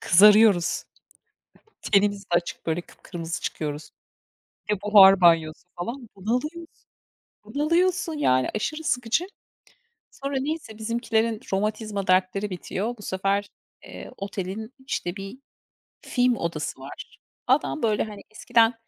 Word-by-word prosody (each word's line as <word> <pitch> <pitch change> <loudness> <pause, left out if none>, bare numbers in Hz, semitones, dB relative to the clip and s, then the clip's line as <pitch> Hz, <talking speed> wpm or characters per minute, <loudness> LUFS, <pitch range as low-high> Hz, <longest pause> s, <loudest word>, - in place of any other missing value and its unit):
kızarıyoruz. 205 -1 +5 1.1
Tenimiz 200 0 +3
de - - -37
açık 175 0 -1
böyle 165 +1 0
kıpkırmızı 170 0 -7
çıkıyoruz. 150 0 -4 0.8
E, 210 - +4
buhar 195 -2 +7
banyosu 165 -1 +3
falan 235 +7 -6
bunalıyoruz. 300 - -4 0.6
Bunalıyorsun 335 +3 +1
yani 130 - +2
aşırı 310 +9 -3
sıkıcı. 250 +4 0 0.9
Sonra 275 0 -5
neyse 280 -7 -4
bizimkilerin 225 0 0
romatizma 210 0 -2
dertleri 185 +2 +1
bitiyor. 195 +6 -4
Bu - - -12
sefer, 195 +1 -1 0.3
eee, - - -10
otelin 200 +3 -5
işte 175 -7 -3
bir 195 +5 -8 0.6
film 250 -1 +1
odası 155 -5 -3
var. 135 - -10 0.3
Adam 270 +2 +1
böyle, 215 -2 +2
hani, 210 -2 -8
eskiden 225 +2 +3
210 Hz, 110 wpm, -25 LUFS, 185-240 Hz, 1.1 s, buhar